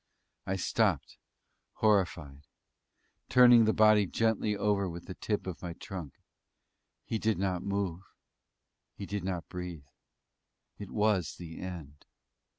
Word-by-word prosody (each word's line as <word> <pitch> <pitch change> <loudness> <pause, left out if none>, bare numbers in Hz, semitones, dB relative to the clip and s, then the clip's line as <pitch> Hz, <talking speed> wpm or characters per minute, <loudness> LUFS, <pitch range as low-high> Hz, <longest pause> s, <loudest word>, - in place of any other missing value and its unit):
I 95 - 0
stopped, 95 - 0 0.5
horrified; 85 -9 0 0.8
turning 120 -2 +7
the 110 - +4
body 110 -2 +5
gently 110 0 0
over 100 -2 +1
with 85 0 -8
the 95 - -7
tip 105 +2 -3
of 95 -3 -6
my 85 -2 -5
trunk 85 -6 -8 0.9
he 110 - -2
did 110 0 +1
not 95 -2 -1
move; 100 -3 -2 0.9
he 100 - -6
did 100 -1 -4
not 90 -3 -3
breathe; 90 -5 -7 0.9
it 100 -2 -7
was 105 -5 +1
the 80 -2 -9
end. 80 -6 -8
95 Hz, 125 wpm, -30 LUFS, 85-105 Hz, 0.9 s, turning